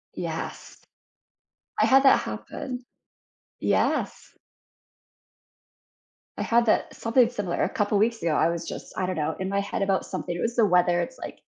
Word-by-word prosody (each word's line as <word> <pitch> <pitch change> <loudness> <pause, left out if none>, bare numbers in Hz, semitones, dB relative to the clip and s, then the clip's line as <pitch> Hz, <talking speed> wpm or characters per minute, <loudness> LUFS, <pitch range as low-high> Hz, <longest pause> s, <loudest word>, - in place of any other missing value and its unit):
Yes, - - -5 1.0
I - - +4
had 270 +1 +6
that 270 - +6
happen 250 -1 -6 0.8
Yes. - - 0 2.0
I - - -2
had 235 0 +2
that - - +2
something 235 +1 +3
similar 205 -7 -2
a - - +1
couple 205 0 0
weeks 225 +2 +1
ago, 165 -2 +1
I 165 - +3
was, 170 0 -4
just, - - -7
I 185 - -1
don't 185 - -2
know, 155 0 -1
in 190 0 -2
my 200 0 0
head 200 - -3
about 195 -1 +1
something. 180 -2 -4
It 175 - -4
was 235 +1 -1
the 230 -3 +4
weather, 175 -2 +3
it's, 170 - -6
like - - -8
200 Hz, 165 wpm, -26 LUFS, 175-235 Hz, 2.0 s, had